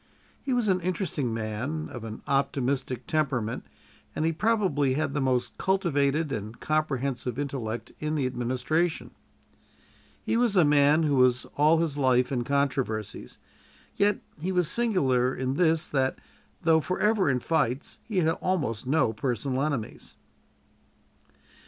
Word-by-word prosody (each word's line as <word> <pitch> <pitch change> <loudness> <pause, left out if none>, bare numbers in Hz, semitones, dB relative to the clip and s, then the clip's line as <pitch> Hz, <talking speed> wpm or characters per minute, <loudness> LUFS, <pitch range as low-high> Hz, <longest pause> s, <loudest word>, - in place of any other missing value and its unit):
He 270 - -3
was 245 -3 +1
an 185 -2 +2
interesting 170 - -1
man, 115 +8 -3
of 120 -4 -8
an 110 -1 -7
optimistic 135 -2 -1
temperament, 130 -8 -1 0.5
and 155 - 0
he 165 - +1
probably 180 - +1
had 150 -1 -1
the 145 - -1
most 130 -2 0
cultivated 155 -5 +1
and 110 -2 -5
comprehensive 135 -5 -1
intellect 125 -6 -4
in 155 0 -2
the 140 -4 0
administration. 130 +7 -1 1.1
He - - 0
was 235 -4 +2
a 175 -4 +6
man 145 +2 +4
who 145 -3 +2
was 125 -1 +3
all 155 +3 +4
his 160 -3 -1
life 125 -1 +3
in 125 -3 0
controversies, 135 -6 -2 0.6
yet 205 0 +2 0.2
he 180 +5 -2
was 180 -3 +2
singular 135 - +2
in 130 0 -2
this, 160 +1 +2
that, 135 -2 0 0.5
though 160 -1 +4
forever 190 +2 +1
in 125 -2 +1
fights, 140 -2 -1
he 215 -4 -5
had 160 - +2
almost 140 -11 -1
no 135 -5 +2
personal 125 +3 -2
enemies. 140 -7 -4
140 Hz, 140 wpm, -27 LUFS, 125-165 Hz, 1.1 s, a